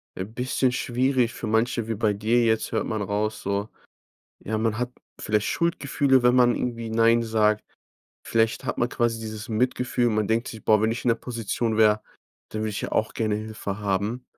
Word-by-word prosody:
äh, 95 - -3
bisschen 125 +3 0
schwierig 125 -1 +1
für - - -5
manche 115 +1 +1
wie 115 - -2
bei 105 0 +1
dir 110 +4 +2
jetzt 110 -1 +1
hört - - 0
man 110 -1 -2
raus, 105 +2 -2
so 100 +2 -2 0.8
ja, 110 +1 -1
man 110 -1 0
hat 125 0 -2 0.3
vielleicht 105 -1 0
Schuldgefühle, 140 -5 +1
wenn 125 0 +5
man 120 -1 +5
irgendwie 115 -2 -3
„Nein“ 115 +1 +4
sagt. 110 -1 +2 0.6
Vielleicht 115 0 +1
hat - - -3
man 120 - +2
quasi 115 -2 0
dieses 110 +1 -6
Mitgefühl. 120 +1 +1
Man 110 -1 0
denkt 115 +2 +1
sich: 110 - -9
„Boah, 110 -1 +4
wenn 110 - +2
ich 120 - -6
in 125 - +2
der 115 - +5
Position 115 -1 -2
wäre, 110 -1 +4 0.5
dann 110 0 -3
würde 110 - -1
ich 100 - -4
ja - - -4
auch 110 - +1
gerne 110 -2 -1
Hilfe 105 -1 -5
haben“. 105 +5 -1
110 Hz, 195 wpm, -25 LUFS, 110-120 Hz, 0.8 s, wenn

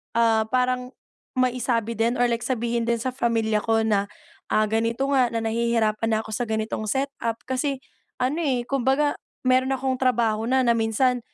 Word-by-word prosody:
ah, 225 -1 +3
parang 250 +1 0 0.4
maisabi 245 -3 0
din 230 +2 0
or 245 - +2
like 230 - 0
sabihin 235 -2 -1
din 235 - +2
sa 245 +3 -3
pamilya 225 -4 +1
ko 225 +1 +1
na, 205 -2 +1 0.4
ah, 215 - +2
ganito 230 +5 0
nga 260 -3 +4
na 230 -1 -3
nahihirapan 225 -1 0
na 220 -1 +1
ako 220 - -9
sa 240 +2 -2
ganitong 220 0 -2
setup 265 -1 -1
kasi 265 +1 -2 0.3
ano 265 +6 -1
eh, 260 -7 0
kumbaga 270 +3 +1 0.2
meron 260 +1 +3
akong 260 -1 -2
trabaho 230 -3 +1
na 260 +1 +3
na 235 - +4
minsan 230 +3 +1
235 Hz, 170 wpm, -24 LUFS, 225-255 Hz, 0.4 s, nga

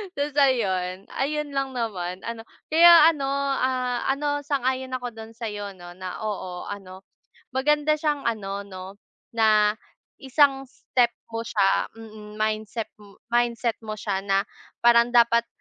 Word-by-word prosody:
Tas 285 0 -2
ayun. 190 -8 +1
Ayun 300 +2 -2
lang 270 -1 -2
naman 190 -6 -3
ano 230 -1 -5 0.3
kaya 335 0 +8
ano, 285 -4 -4 0.3
ah, 255 -1 0
ano 290 +1 0
sang-ayon 260 -2 -2
ako 245 -1 -4
dun 225 0 -10
sayo 205 -4 -5
no 175 -1 -11
na 185 0 -7
oo 185 -4 -4
ano 190 -2 -8 0.5
maganda 300 +3 +2
siyang 300 -2 -1
ano 200 -3 -3
no 185 -2 -9 0.5
na 215 -2 +4 0.5
isang 270 0 +2
step 245 -2 +1 0.2
mo 225 - -2
siya. 200 -4 +1
Mhm, 215 -1 -11
mindset, 215 +1 -2 0.4
mindset 240 -1 +1
mo 215 -1 -6
siya 200 -2 -2
na 195 0 +1 0.4
parang 235 0 +6
dapat 235 0 +5
230 Hz, 135 wpm, -25 LUFS, 205-270 Hz, 0.5 s, kaya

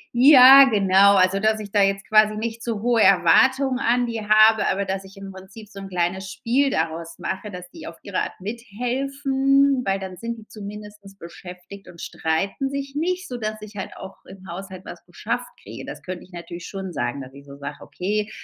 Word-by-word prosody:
Ja, 270 +1 +9
genau. 200 -3 +4
Also, 185 +1 +3
dass 215 +1 +1
ich 205 -2 -8
da 205 - +2
jetzt 195 0 0
quasi 215 0 +4
nicht 230 +1 -5
zu 225 -3 -4
hohe 240 -2 +2
Erwartungen 260 +9 +4
an 245 0 +1
die 230 -2 -4
habe, 215 0 +4
aber 195 +1 -1
dass 190 0 -4
ich 195 +1 -16
im 195 0 -9
Prinzip 190 +3 -13
so 200 -2 -11
'n 195 0 -9
kleines 185 +2 -2
Spiel 250 +8 0
daraus 165 -3 -3
mache, 210 +2 -5
dass 180 -2 -9
die - - -11
auf 165 - -9
ihre 200 -2 -3
Art - - -5
mithelfen, 270 +5 0
weil 195 0 0
dann 190 -1 -7
sind 230 0 -5
die 215 - -15
zumindest 210 -1 -11
beschäftigt 180 +3 -12
und 170 - -15
streiten 195 - -2
sich 275 0 -5
nicht, 365 +4 -2
sodass 215 -3 -5
ich 215 0 -12
halt 195 - -7
auch - - -11
im 190 0 -14
Haushalt 185 +1 -9
was - - -10
geschafft - - -4
kriege. - - -9
Das - - -9
könnte 185 -1 -7
ich 185 - -19
natürlich 170 0 -9
schon 190 -3 -7
sagen, 120 +1 -3
dass 130 0 -11
ich 140 0 -14
so 140 0 -12
sage: 145 +1 -7
„Okay, 210 +3 -3
200 Hz, 200 wpm, -22 LUFS, 190-235 Hz, -, Ja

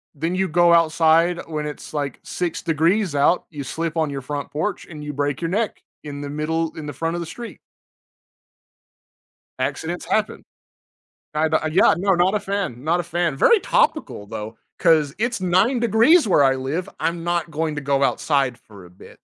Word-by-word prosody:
then 165 +5 -2
you 190 +1 +1
go 175 +1 +4
outside 165 +1 +3
when 155 -2 -4
it's 150 - -8
like 145 -3 -3
6 175 -2 -3
degrees 170 +2 +1
out, 145 +5 +3
you 145 -3 -6
slip 165 +3 -4
on 160 -2 +1
your 140 -1 -5
front 145 +2 -5
porch, 165 +7 -3
and 155 -3 -9
you 150 0 -5
break 145 -1 -1
your 165 - -1
neck 215 +3 -1 0.2
in 145 -1 -7
the 145 - -5
middle 160 +2 -2
in 155 - -6
the 145 - -5
front 165 +5 -2
of 175 - -3
the - - -4
street. 235 +6 -9 2.0
Accidents - - -3
happen. - - -1 0.9
I 155 +1 +2 0.2
yeah, 180 - +5
no, 195 +2 +2
not 180 +3 +2
a 210 - +1
fan, 195 -12 -3
not 165 +3 +2
a - - -2
fan. 170 -3 -1
Very 430 - +5
topical 315 - 0
though, 110 +1 -7 0.2
'cause 155 -4 +3
it's 235 -1 -1
9 185 +8 +2
degrees 235 - +5
where 180 -7 +4
I 135 -1 +3
live, 140 +7 -3
I'm 170 0 -2
not 175 -1 -1
going 155 0 -1
to - - -2
go 140 -1 0
outside 135 -4 +1
for 100 -4 -15
a 90 - -15
bit. 90 - -16
160 Hz, 185 wpm, -22 LUFS, 145-180 Hz, 2.0 s, yeah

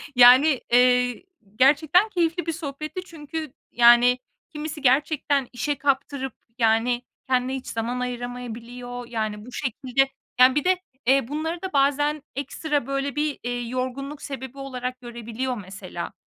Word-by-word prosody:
Yani, 255 +3 +7
eee, 250 +2 +4 0.3
gerçekten 305 - +4
keyifli 345 -2 0
bir 330 - 0
sohbetti 305 +3 -5
çünkü, 310 -3 -7 0.2
yani, 240 +1 +6 0.3
kimisi 300 -1 -6
gerçekten 280 0 +2
işe 290 +3 -1
kaptırıp, 275 -1 -1 0.2
yani, 230 +1 +2 0.3
kendine 255 0 +1
hiç 265 - -7
zaman 235 +2 -2
ayıramayabiliyor. 245 0 -6
Yani, 215 -2 -3
bu 250 - -11
şekilde, 265 +1 0 0.3
yani 255 +2 +7
Bir 295 - +2
de, 370 0 +2 0.3
eee, 270 -2 +4
bunları 320 +4 -3
da 380 -1 -5
bazen 290 +2 +2
ekstra, 285 0 -2
böyle, 275 +1 -2
bir, 295 -1 -1
eee, 245 0 -2
yorgunluk 260 +3 -4
sebebi 265 -1 -7
olarak 255 -2 -5
görebiliyor 240 +1 -4
mesela. 185 -3 -7
265 Hz, 135 wpm, -24 LUFS, 245-290 Hz, 0.3 s, Yani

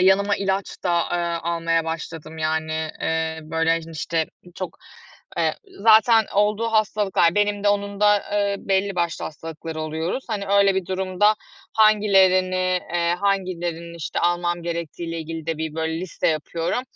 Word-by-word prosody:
yanıma 200 +2 +4
ilaç 195 0 -1 0.2
da, 175 -2 +2
eee, - - +2 0.3
almaya 165 -1 0
başladım, 160 -1 -6
yani, 160 0 -1
eee, 160 0 -1
böyle, 160 +1 0
hani, 165 0 +1
işte, 160 +1 -1 0.3
çok, 185 - -6 0.6
eee, - - +1 0.3
zaten 225 +1 +6
olduğu 210 +3 +2
hastalıklar, 205 -5 +2
benim 205 0 +1
de - - +5
onun 200 0 -1
da, 210 0 +6 0.2
eee, 200 -1 +1
belli 195 0 0
başlı 170 -2 -1
hastalıkları 160 0 -7
oluyoruz. 160 - -3
Hani, 210 -3 -2
öyle 200 -1 +4
bir 190 -2 -1
durumda 190 +2 +2 0.4
hangilerini 185 -4 +4
eee, 170 0 +2
hangilerini, 175 -4 -2
işte, 165 - -4
almam 175 0 0
gerektiğiyle 170 0 -4
ilgili 160 0 -6
de 165 -2 -2
bir 160 -1 -3
böyle 160 0 -2
liste 185 -1 -1
yapıyorum. 165 +7 -1
175 Hz, 145 wpm, -23 LUFS, 165-200 Hz, 0.6 s, zaten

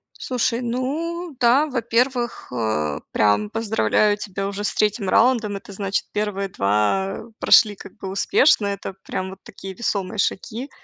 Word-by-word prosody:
Слушай, 245 -1 -1
ну 295 +7 -3
да, 255 +6 +4
во-первых, 240 -1 0
э, 110 -11 -1
прям 105 0 +2
поздравляю 215 -1 +1
тебя 195 -1 -4
уже 200 +1 -4
с - - -1
3 210 -2 0
раундом, 225 -4 +3
это 200 - -11
значит, 195 0 -2
первые 205 -2 -2
2 105 - 0 0.2
прошли 210 -2 +6
как - - -12
бы 195 -2 -6
успешно, 205 +3 +3
это 200 -1 -4
прям 185 0 -4
вот 190 - -11
такие 195 0 -9
весомые 200 -3 -2
шаги. 225 +7 -2
205 Hz, 145 wpm, -22 LUFS, 190-240 Hz, 0.2 s, прошли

